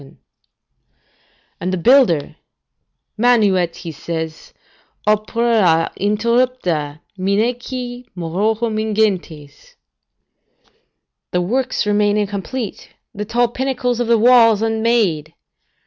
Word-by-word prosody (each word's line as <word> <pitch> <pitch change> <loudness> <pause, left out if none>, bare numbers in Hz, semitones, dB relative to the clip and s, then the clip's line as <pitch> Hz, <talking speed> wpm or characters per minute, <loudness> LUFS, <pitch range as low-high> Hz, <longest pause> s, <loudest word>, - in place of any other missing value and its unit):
] 135 - -27
And 180 +2 -2
the 185 - -1
builder, 200 - +3 0.8
"Manuet," 205 -8 +3
says 160 -1 -6
he, - - -26 0.5
"opera 215 -5 +2
interrupta, 205 - 0 0.2
minaeque 245 +5 -2
Murorum 215 +6 -1
ingentes." 195 -9 -2 1.5
["The 180 - 0
works 250 +6 -1
remain 205 0 +2
incomplete, 205 +3 -4 0.2
the 210 -1 -5
tall 240 +2 +1
pinnacles 250 -1 -2
of 240 - -1
the 235 0 +4
walls 230 -2 +5
unmade." 220 -9 0
215 Hz, 85 wpm, -18 LUFS, 180-240 Hz, 1.5 s, walls